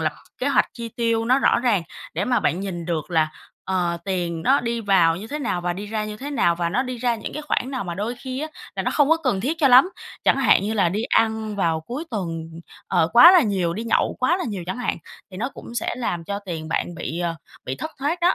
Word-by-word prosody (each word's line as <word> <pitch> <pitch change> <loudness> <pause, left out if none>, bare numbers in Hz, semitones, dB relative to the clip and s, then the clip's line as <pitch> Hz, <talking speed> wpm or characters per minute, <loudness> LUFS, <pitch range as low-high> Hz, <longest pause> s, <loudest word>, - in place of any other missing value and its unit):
lập - - 0 0.3
kế - - 0
hoạch - - +3
chi 235 -1 -6
tiêu 230 0 0
nó 255 +3 +4
rõ 240 - +3
ràng 230 -8 +2 0.3
để 180 +6 0
mà 245 +1 +1
bạn 180 - 0
nhìn 175 -4 -4
được 165 -1 -3
là, 155 -2 +2 0.3
ờ, 175 -2 0
tiền 175 -4 -2
nó 275 +3 +4
đi 235 -1 -2
vào 180 -6 +3
như 205 - -7
thế 295 +6 -4
nào, 230 -10 -1
và 175 0 -1
đi 200 +4 -6
ra 215 0 -2
như 210 0 -6
thế 280 +5 -6
nào, 195 -11 +2
và 170 -1 0
nó 225 +9 +1
đi 255 -1 -5
ra 240 -1 +1
những 220 - -6
cái 305 - -5
khoản 265 -3 -1
nào. 255 -7 -3
Mà 175 - -4
đôi 210 +6 -3
khi 260 +1 -5
á 310 - -3 0.3
là - - -1
nó - - 0
không 290 -1 +3
có 325 - +5
cần 255 -12 -1
thiết 310 +8 -2
cho 280 -4 +4
lắm, 260 +9 +7 0.3
chẳng - - +4
hạn 270 -7 +4
như 215 +2 -1
là 195 -5 +3
đi 205 +6 -2
ăn 220 -2 +1
vào 165 -4 +1
cuối 250 - -6
tuần, 165 -6 -4 0.4
ờ, 160 - +2
quá 245 +9 +10
là 360 -4 +7
nhiều, 185 -5 0
đi 225 +3 -4
nhậu 230 - +1
quá 320 +8 +2
là 375 - -3
nhiều 195 -5 -5
chẳng 215 +7 -4
hạn, 250 - -1 0.3
thì 185 - -9
nó 245 +6 -2
cũng 235 - -10
sẽ 235 - -1
làm 175 -9 -3
cho 200 +2 -3
tiền 170 -6 -6
bạn 175 - -2
bị, 165 0 -5
ờ, 170 -1 -1 0.3
bị 130 - -4
thất 315 - -5
thoát 300 +6 -1
đó. 350 +2 +4
215 Hz, 270 wpm, -23 LUFS, 175-255 Hz, 0.4 s, quá